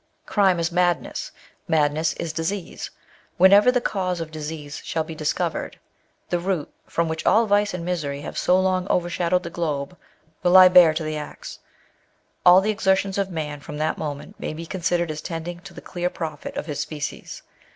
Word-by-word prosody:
Crime 190 -4 +2
is 165 +1 0
madness. 175 -1 0 0.4
Madness 155 +1 +2
is 165 -2 -5
disease. 170 +3 -4 0.5
Whenever 200 +6 +7
the 250 - +2
cause 185 -6 -2
of 165 -1 -5
disease 150 -1 -6
shall 160 - -1
be 160 - -8
discovered, 155 -1 -2 0.5
the 175 - 0
root, 175 -4 -2
from 170 0 0
which 160 0 -3
all 230 +2 +4
vice 205 0 +2
and 180 -2 -5
misery 150 -6 -2
have - - -7
so 180 +1 +3
long 185 0 +1
overshadowed 175 0 +1
the 170 - -6
globe, 155 -1 -3 0.5
will 175 - +2
lie 185 -1 +10
bare 175 -3 +7
to 160 - -2
the 155 0 -3
axe. 150 - -8 0.8
All 180 +1 +8
the 215 +2 +1
exertions 195 -1 +1
of 195 -1 0
man, 150 -4 -4
from 150 +1 -8
that 155 +1 -1
moment, 145 -2 -6
may - - -4
be 165 +1 -7
considered 175 -1 -1
as 155 0 -6
tending 170 +1 -5
to 185 0 -12
the - - -9
clear 175 0 -3
profit 155 -4 -6
of - - -3
his 150 -3 -5
species. 150 -2 -5
170 Hz, 185 wpm, -23 LUFS, 155-185 Hz, 0.8 s, lie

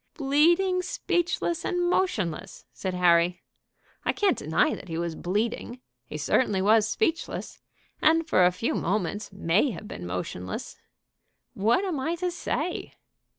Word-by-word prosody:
"'Bleeding, 340 +6 +3
speechless, 350 -6 -1
and 355 -1 0
motionless!'" 195 - -1
said 185 -1 -4
Harry. 175 0 +3 0.6
"I - - +2
can't 400 -3 +2
deny 155 +2 +1
that - - -8
he 165 -2 -4
was 170 -1 -2
bleeding; 220 +8 -2 0.3
he - - -6
certainly 210 -7 +1
was 215 +2 +4
speechless, 335 - -2 0.4
and 325 +1 +4
for 185 - +4
a 180 - +5
few 225 +6 -2
moments 205 +2 -2
may 195 - +2
have 210 -1 -7
been 90 - -7
motionless. 90 0 -5 0.8
What 230 - +2
am 345 -7 -2
I 320 +6 -1
to 360 +1 -2
say?" 345 0 -3
220 Hz, 140 wpm, -27 LUFS, -, 0.8 s, a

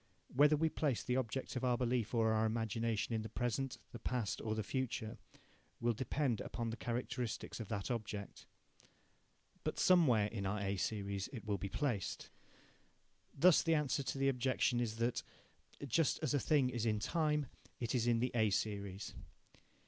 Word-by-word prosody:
Whether 145 +3 +6
we 160 +2 +2
place 145 -6 0
the 125 - 0
object 130 +2 -2
of 130 - -2
our 125 -1 +3
belief 120 -2 0
or 110 -1 +3
our 110 0 +3
imagination 115 0 -1
in 110 - 0
the 110 - -6
present, 120 +3 -1
the 120 - -8
past, 120 -6 -2
or 110 -1 -1
the 110 - -1
future, 110 -1 -3 0.6
will 120 0 +2
depend 130 0 0
upon 115 -1 -3
the - - -3
characteristics 120 -1 -3
of 110 - -5
that 100 +2 -3
object. 105 -3 -5 1.2
But - - -2
somewhere 145 - +5
in 105 -2 -3
our 105 +2 -1
A 100 0 -1
series 100 -1 -2
it 115 -5 -7
will 100 -2 -1
be 100 - -3
placed. 120 -6 -2 1.1
Thus 170 +3 +7
the 165 -1 +3
answer 150 -1 +1
to 135 - -3
the 135 0 +3
objection 125 -1 +1
is 115 -3 -1
that, 115 +2 0 0.6
just 140 +4 +2
as - - +1
a 145 - +3
thing 135 -1 +3
is 120 -2 -1
in 105 -1 +2
time, 150 +4 +1 0.3
it 120 -1 -2
is 120 -2 +1
in 115 -1 +3
the 125 - +1
A 110 -3 +3
series. 100 -1 -2
120 Hz, 175 wpm, -37 LUFS, 110-130 Hz, 1.2 s, Thus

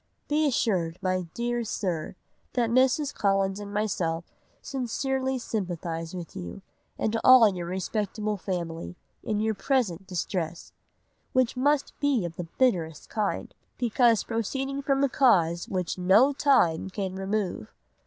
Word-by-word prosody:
Be 300 +1 +2
assured, 185 - 0
my 185 -1 0
dear 240 0 -1
sir, 185 -8 -3 0.4
that 235 -2 +1
Mrs. 265 +4 +3
Collins 195 -1 +1
and 205 -1 -7
myself 180 -6 -1 0.4
sincerely 265 +1 -2
sympathise 175 -7 -4
with 175 -3 -7
you, 90 - -7 0.3
and 220 +1 0
all 255 -3 +9
your 175 -2 -5
respectable 210 +3 -2
family, 175 -3 -4 0.3
in 215 -1 -1
your 220 +1 +1
present 200 - 0
distress, 175 -2 -3 0.6
which 255 -1 +2
must 285 +2 +1
be 275 -9 +2
of 165 -1 -6
the 175 - -5
bitterest 170 - +1
kind, 210 -2 -2 0.2
because 235 -2 +3
proceeding 270 +5 -2
from 275 0 +1
a - - +5
cause 175 -11 +3
which 185 -1 -2
no 205 +10 +5
time 250 - +3
can 190 -1 -3
remove. 195 - -3
210 Hz, 135 wpm, -27 LUFS, 180-255 Hz, 0.6 s, all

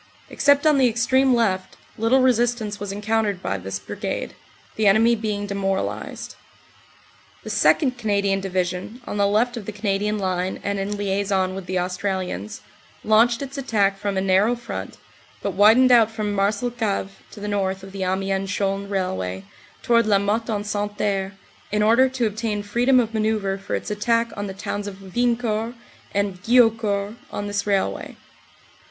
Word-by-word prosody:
Except 285 +1 +3
on 300 -3 +5
the 260 - +5
extreme 255 +3 +3
left, 190 -5 0 0.2
little 240 +4 +3
resistance 240 -4 +1
was 205 -1 -4
encoutered 210 -1 0
by 95 - -3
this 95 +1 -4
Brigade, 95 - -5 0.4
the 215 -1 +2
enemy 220 +4 +5
being 210 -2 -3
demoralized. 195 -1 -3 1.1
The - - -5
2nd. 255 -5 +3
Canadian 200 -3 +1
Division, 185 +4 -3
on - - -4
the 200 0 +3
left 235 +4 +1
of 210 - -7
the - - -3
Canadian 210 0 -1
line 185 -1 -2
and 200 0 -1
in 195 +1 -2
liason 195 -2 0
with 190 -1 -7
the 185 +1 -1
Australians, 180 - -3 0.4
launched 230 +4 +3
its 275 0 -6
attack 205 -7 +1
from 200 -1 -2
a - - +1
narrow 195 +5 +3
front, 240 0 -7 0.5
but - - -1
widened 225 +6 +6
out 230 -3 +6
from 215 -2 -3
Marcelcave 205 0 -1 0.2
to - - -12
the 205 - -5
north 195 -2 -1
of 195 - -10
the 195 0 -7
Amiens 195 +1 -1
Chaulnes 200 0 -1
railway 95 - -2 0.4
toward 235 -2 +3
Lamotte 210 +3 +1
en 205 -2 -1
Santerre, 205 -2 -2 0.4
in 210 0 +1
order 235 +5 +5
to 255 -2 -1
obtain 215 -1 -2
freedom 245 +5 +3
of 230 -2 -1
manoeuvre 215 -3 0
for 195 - -3
its - - -4
attack 230 +2 0
on 205 -1 -4
the 190 - -7
towns 205 +1 -4
of 195 -2 -10
Wiencourt 235 -1 0 0.4
and 200 -2 -1
Guillaucourt 225 -2 +2
on 205 - -4
this 205 0 -2
railway. 195 - -1
205 Hz, 160 wpm, -23 LUFS, 195-230 Hz, 1.1 s, widened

